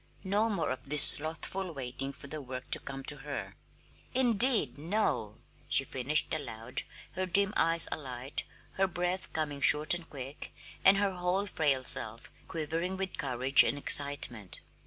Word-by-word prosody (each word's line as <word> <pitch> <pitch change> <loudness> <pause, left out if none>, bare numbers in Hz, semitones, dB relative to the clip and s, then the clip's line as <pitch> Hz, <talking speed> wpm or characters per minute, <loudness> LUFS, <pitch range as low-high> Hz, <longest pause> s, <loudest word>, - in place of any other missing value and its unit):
No 205 +4 -1
more 170 -10 -3
of 130 +1 -8
this 150 -1 +8
slothful 165 +3 +2
waiting 135 +1 -6
for 140 - -15
the 150 +2 -7
work 130 -1 -10
to - - +5
come 135 0 -9
to - - -1
her! - - -8 0.6
"Indeed, 240 - +3
no!" 150 - -3 0.3
she 135 - +1
finished 135 +3 0
aloud, 125 -4 -3 0.3
her 185 +1 -4
dim 200 +3 +1
eyes 165 0 +6
alight, 130 -1 -5 0.3
her 195 0 +1
breath 180 +1 -4
coming 145 -3 -5
short 150 +6 +5
and 175 -1 -5
quick, 135 0 -9 0.3
and 195 +1 +6
her 200 -1 0
whole 180 +2 -2
frail 145 -8 -1
self 115 -1 0 0.2
quivering 165 +4 -4
with 190 -1 -6
courage 130 0 +4
and 145 - -2
excitement. 140 -9 +2
150 Hz, 155 wpm, -29 LUFS, 135-185 Hz, 0.6 s, this